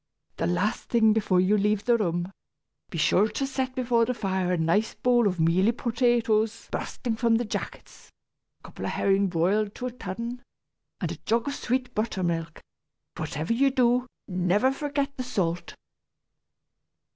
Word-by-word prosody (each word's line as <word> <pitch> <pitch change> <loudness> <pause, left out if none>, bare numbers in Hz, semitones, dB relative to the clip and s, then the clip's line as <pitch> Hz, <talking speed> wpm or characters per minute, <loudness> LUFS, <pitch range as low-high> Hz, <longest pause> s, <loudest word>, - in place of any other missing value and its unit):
The 165 - 0
last 180 +5 0
thing 220 -2 +4
before 205 -4 +2
you 185 +3 +3
leave 210 0 +1
the 240 - +4
room, 175 -3 -1 0.6
be 170 - -6
sure 180 +6 +3
to 245 +5 -2
set 265 -1 -3
before 240 -3 +2
the 250 +1 -2
fire 190 -4 -1
a 180 - +1
nice 170 +7 +1
bowl 245 -3 +3
of 180 -3 -2
mealy 175 +7 +3
potatoes 230 -2 +1
bursting 230 -3 -3
from 230 0 +3
their 235 +1 0
jackets, 210 - -7 0.5
a - - -40
couple - - -8
of - - -2
herrings 195 0 +2
broiled 195 +5 +1
to 250 - -5
a 250 - -2
turn, 235 +2 -6 0.6
and - - -1
a - - -6
jug 230 +4 0
of 280 - -1
sweet 250 -1 -2
buttermilk 175 -7 -1
and, - - -15 0.6
whatever 155 +9 -2
you 275 +4 +3
do, 250 -1 +2 0.2
never 185 +7 +2
forget 280 0 -2
the 255 - -2
salt!" 180 -8 -2
220 Hz, 165 wpm, -26 LUFS, 185-245 Hz, 0.6 s, thing